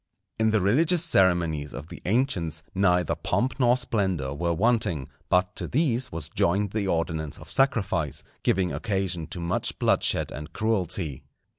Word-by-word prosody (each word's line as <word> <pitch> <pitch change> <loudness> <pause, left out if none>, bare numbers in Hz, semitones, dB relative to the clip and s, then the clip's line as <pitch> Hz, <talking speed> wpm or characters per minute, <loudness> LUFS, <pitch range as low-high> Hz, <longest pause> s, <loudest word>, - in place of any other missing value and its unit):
In 110 0 +3
the 110 -2 +2
religious 160 - +3
ceremonies 85 - +2
of 80 - -8
the - - -10
ancients 90 - 0
neither 90 -3 +2
pomp 130 +3 -1
nor 125 -1 +4
splendour 95 - -1
were 85 +4 -1
wanting; 90 - +2 0.2
but 90 0 +2
to - - -2
these 130 -4 0
was 80 -1 -4
joined 100 +3 0
the 105 -2 -1
ordinance 80 -4 -2
of - - -11
sacrifice, 100 - +1 0.2
giving 90 -2 +1
occasion 95 -6 -2
to 90 - -6
much 85 +1 -1
bloodshed - - +2
and 75 +2 -8
cruelty. 95 - -1
95 Hz, 150 wpm, -26 LUFS, 85-110 Hz, 0.2 s, nor